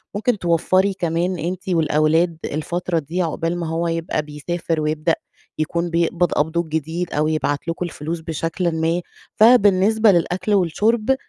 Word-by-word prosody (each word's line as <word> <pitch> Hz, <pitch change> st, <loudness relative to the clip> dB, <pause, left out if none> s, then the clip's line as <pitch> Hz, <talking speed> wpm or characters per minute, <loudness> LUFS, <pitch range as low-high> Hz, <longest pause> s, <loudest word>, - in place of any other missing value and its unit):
ممكن 215 Hz, +2 st, 0 dB
توفّري 185 Hz, +3 st, +2 dB
كمان 175 Hz, 0 st, -1 dB
أنتِ 185 Hz, +3 st, -4 dB
والأولاد 160 Hz, 0 st, +2 dB
الفترة 170 Hz, +3 st, -2 dB
دي 165 Hz, +5 st, -3 dB
عقبال 165 Hz, +1 st, -2 dB
ما 170 Hz, -, -3 dB
هو 165 Hz, +1 st, -1 dB
يبقى 165 Hz, -2 st, -1 dB
بيسافر 155 Hz, +2 st, -3 dB
ويبدأ 155 Hz, +2 st, 0 dB, 0.4 s
يكون 170 Hz, +2 st, -1 dB
بيقبض 170 Hz, +1 st, +1 dB
قبضه 160 Hz, +3 st, +1 dB
الجديد 160 Hz, +2 st, -3 dB
أو 150 Hz, +1 st, +1 dB
يبعت 155 Hz, -1 st, -1 dB
لكم 170 Hz, +2 st, -2 dB
الفلوس 165 Hz, 0 st, -5 dB
بشكل 165 Hz, +2 st, -2 dB
ما، 165 Hz, +2 st, 0 dB, 0.3 s
فبالنسبة 215 Hz, -1 st, +5 dB
للأكل 180 Hz, +3 st, 0 dB
والشرب 215 Hz, +8 st, +2 dB
170 Hz, 140 wpm, -21 LUFS, 160-180 Hz, 0.4 s, فبالنسبة